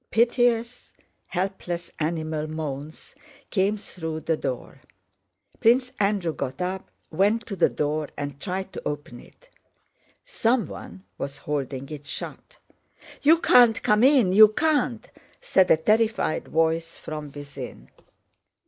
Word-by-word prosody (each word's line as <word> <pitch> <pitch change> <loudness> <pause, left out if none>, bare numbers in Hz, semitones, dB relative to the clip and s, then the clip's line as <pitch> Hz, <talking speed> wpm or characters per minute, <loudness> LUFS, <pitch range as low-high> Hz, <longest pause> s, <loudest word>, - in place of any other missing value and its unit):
Piteous, 235 +1 +1 0.4
helpless, 180 -2 -3
animal 155 -1 -2
moans 155 -1 -6 0.4
came 200 +1 +1
through 160 -5 -6
the 160 - 0
door. 130 -5 -5 0.8
Prince 250 +3 +3
Andrew 200 -5 +1
got 135 -2 -5
up, 185 +1 -3 0.2
went 210 +4 +2
to 200 - -5
the - - +3
door, 150 0 -2
and 145 -1 -5
tried 190 0 -4
to - - -6
open 145 -4 -5
it. - - -19 0.8
Someone 230 - -2 0.2
was 140 0 -4
holding 135 -2 -4
it 150 -2 -8
shut. - - -7 0.6
"You 320 +3 +6
can't 240 -7 +5
come 210 +2 +3
in! 255 -9 +5
You 215 +2 +10
can't!" 255 -1 0 0.3
said 190 -1 +3
a - - +6
terrified 220 0 +1
voice 165 +1 0
from 150 -2 -7
within. 140 -2 -9
180 Hz, 120 wpm, -25 LUFS, 150-225 Hz, 0.8 s, You